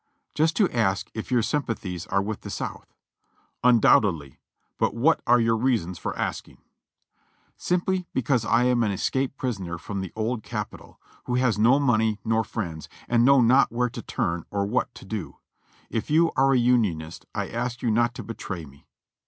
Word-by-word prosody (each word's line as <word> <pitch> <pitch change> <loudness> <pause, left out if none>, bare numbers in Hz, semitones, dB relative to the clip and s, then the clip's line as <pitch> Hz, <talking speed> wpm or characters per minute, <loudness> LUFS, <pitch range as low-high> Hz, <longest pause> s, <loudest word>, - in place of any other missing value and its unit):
"Just 160 +2 +1
to 205 - +4
ask 100 -5 0
if 110 - -6
your 120 -2 +3
sympathies 105 - -3
are 100 0 +1
with 105 +1 -4
the - - -8
South." - - -6 0.7
"Undoubtedly; 100 - +3 0.4
but - - +1
what 150 +8 +3
are 120 0 +5
your 115 -1 +2
reasons 110 -8 0
for - - -4
asking?" - - -4 1.0
"Simply 180 0 -1
because 130 -2 +1
I 115 +2 +3
am 125 -1 +2
an 110 - +2
escaped 130 +7 -1
prisoner 95 -9 -3
from 100 +3 -5
the 95 - -6
Old 110 +1 -2
Capi - - -5
tol, - - -18 0.3
who 125 - -1
has 125 -4 +1
no 120 +5 +5
money 110 -6 +2
nor 115 0 +2
friends, 85 -10 -5 0.2
and 120 -1 +3
know 135 +1 +6
not 125 +4 +4
where 120 +1 0
to - - -7
turn 85 0 -2
or 100 -1 -1
what 125 +4 -1
to - - -12
do. 100 -3 -6 0.5
If 115 - -3
you 165 +2 +4
are 135 +1 +4
a - - +4
Unionist 105 -10 0
I - - -2
ask 120 +1 -4
you 120 - +2
not 120 +2 +2
to - - -6
betray 95 -7 -6
me." 70 -1 -18
115 Hz, 180 wpm, -25 LUFS, 100-125 Hz, 1.0 s, know